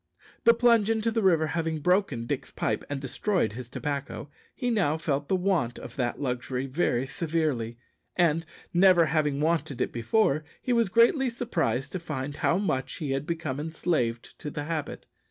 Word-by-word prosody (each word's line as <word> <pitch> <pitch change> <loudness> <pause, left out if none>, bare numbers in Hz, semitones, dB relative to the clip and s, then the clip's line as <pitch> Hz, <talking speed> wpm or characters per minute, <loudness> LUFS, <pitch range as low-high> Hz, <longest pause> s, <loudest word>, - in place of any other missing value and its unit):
The 235 0 +7
plunge 230 -3 +4
into 225 0 +1
the 225 0 0
river 170 -5 +4
having 160 0 -1
broken 180 - +1
Dick's - - -3
pipe - - -2
and 145 -1 -2
destroyed 140 - -1
his 120 +1 -8
tobacco, 140 +1 -4 0.2
he 245 -1 -1
now 180 -9 +2
felt 145 -2 -1
the 190 - +2
want 180 -11 0
of - - -9
that 120 -3 -1
luxury 125 -1 -2
very 135 -3 0
severely, 145 - -1 0.4
and, 165 -2 +3 0.3
never 175 -1 +6
having 150 -3 +1
wanted 155 -4 0
it - - 0
before, 145 - +1 0.2
he 250 - -1
was 230 -4 +3
greatly 240 - +4
surprised 165 - -1
to 185 - -3
find 145 -4 -5
how 165 - +2
much 160 -10 -1
he 150 -5 -3
had 135 +2 -2
become 160 -5 -3
enslaved 150 -7 -2
to 150 - -5
the 145 0 -4
habit. 155 -1 -4
155 Hz, 175 wpm, -27 LUFS, 135-185 Hz, 0.4 s, The